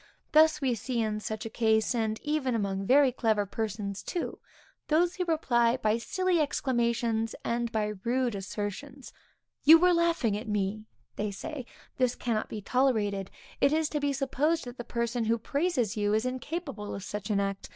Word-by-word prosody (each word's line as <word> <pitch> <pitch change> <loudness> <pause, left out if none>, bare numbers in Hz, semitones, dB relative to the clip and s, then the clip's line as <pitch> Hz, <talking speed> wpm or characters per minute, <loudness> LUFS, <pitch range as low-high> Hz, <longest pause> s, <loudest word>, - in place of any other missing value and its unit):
Thus 310 0 +5
we 260 -3 +2
see, 235 +2 -3
in 215 -1 0
such 215 0 -5
a - - -3
case, 220 0 +2
and 220 -2 -1
even 295 -5 0
among 195 -2 -2
very 275 0 +5
clever 220 -4 +1
persons 205 -1 -4
too, 350 - -4 0.5
those 340 +3 +3
who 365 - 0
reply 245 -7 +2
by 220 -1 +1
silly 370 +7 0
exclamations 235 -5 0
and 235 0 -1
by 210 -2 -1
rude 245 0 +1
assertions. 205 +8 -6 0.5
You 320 +3 +10
were 360 +2 +4
laughing 335 -11 +2
at 215 +3 -5
me, 210 +1 -1 0.3
they 210 0 -1
say; 255 +6 -6 0.3
this 250 -1 +2
cannot 225 -3 -2
be 210 -2 -6
tolerated; 210 -7 +1 0.3
it 280 - +4
is 310 0 +1
to 300 - -1
be 285 0 0
supposed 280 +4 0
that 245 0 -9
the - - -3
person 235 0 -2
who 230 +1 +2
praises 255 - -1
you 205 0 +1
is 220 +3 0
incapable 260 -3 -4
of 195 - -7
such 205 0 -5
an 205 -2 +2
act. 195 -1 -3
235 Hz, 175 wpm, -29 LUFS, 215-280 Hz, 0.5 s, You